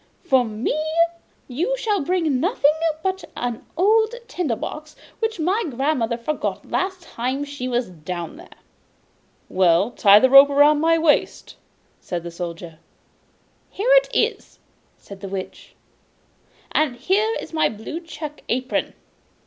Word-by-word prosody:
For 260 -2 +3
me 220 +4 -2 0.7
you 345 - -1
shall 420 -6 0
bring 320 -4 0
nothing 310 - +2 0.3
but 380 0 -2
an 240 -2 -3
old 440 +5 +3
tinder 305 -11 -2
box 305 +7 -7 0.2
which 445 -4 -2
my 380 +8 +1
grandmother 260 -3 -1
forgot 290 +6 -4
last 375 -1 -2
time 260 0 -3
she 285 -3 -6
was 245 -3 -1
down 170 0 -6
there.' - - -13 1.0
'Well, 185 +3 +3
tie 205 -4 +6
the 260 +3 +3
rope 275 +1 +9
round 290 +1 +4
my 330 +1 +3
waist! 320 -2 +1 0.4
'said 175 -2 -5
the 170 - -7
Soldier. 170 -1 -7 0.9
'Here 450 +6 -1
it - - +2
is,' - - -1 0.4
said 200 -1 -12
the 195 - -6
Witch, 190 -1 -7 1.0
'and 300 -5 +1
here 405 - +1
is - - -9
my 315 - +2
blue 220 +9 -7
check 305 -3 -9
apron. 255 +2 -1
285 Hz, 135 wpm, -22 LUFS, 225-350 Hz, 1.0 s, rope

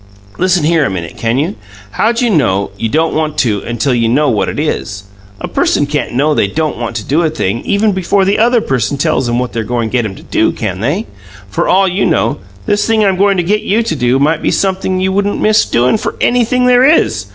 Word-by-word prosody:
"Listen 185 -2 +2
here 165 0 +2
a - - 0
minute, 85 -4 -5
can't 115 +2 -1
you? 145 -3 -1 0.4
How 220 - +1
d'you 235 0 0
know 100 - +1
you 115 +2 -3
don't 160 +6 0
want 155 -1 -2
to 110 -8 0
until 120 +3 -1
you 115 -2 +1
know 145 +4 +2
what 100 -4 0
it - - -4
is? 105 -9 -3 0.4
A - - -5
person 145 - +1
CAN'T 145 -3 -3
know 150 +4 +2
they 100 - +1
don't 155 +4 -2
want 115 -1 -4
to 110 - -3
do 150 +9 0
a 165 - +1
thing 115 -8 -2
even 210 +1 +1
before 190 +1 +1
the 200 +2 +1
other 235 +1 +3
person 135 - -1
tells 140 -4 0
'em 120 - 0
what 125 0 -2
they're 115 - -2
goin' 115 0 -2
to - - -14
get 120 -3 0
'em 95 -3 -5
to - - -13
do, - - 0
can 95 0 -4
they? 150 - -1 0.5
For - - -1
all 195 +1 +3
you 185 +2 0
know, - - 0 0.3
this 205 -2 0
thing 220 -2 +2
I'm 195 -1 +2
goin' 200 +1 +2
to 175 - +1
get 210 +5 0
you 220 +4 0
to 165 - -2
do 125 -1 +1
might 155 +3 +1
be - - 0
sumpthing 190 -1 -1
you 190 0 0
wouldn't 200 +1 -1
miss 215 0 +3
doin' 125 - +1
for - - -4
anything 245 +1 +1
there 250 0 +4
is! 110 - +2
155 Hz, 245 wpm, -13 LUFS, 120-200 Hz, 0.5 s, there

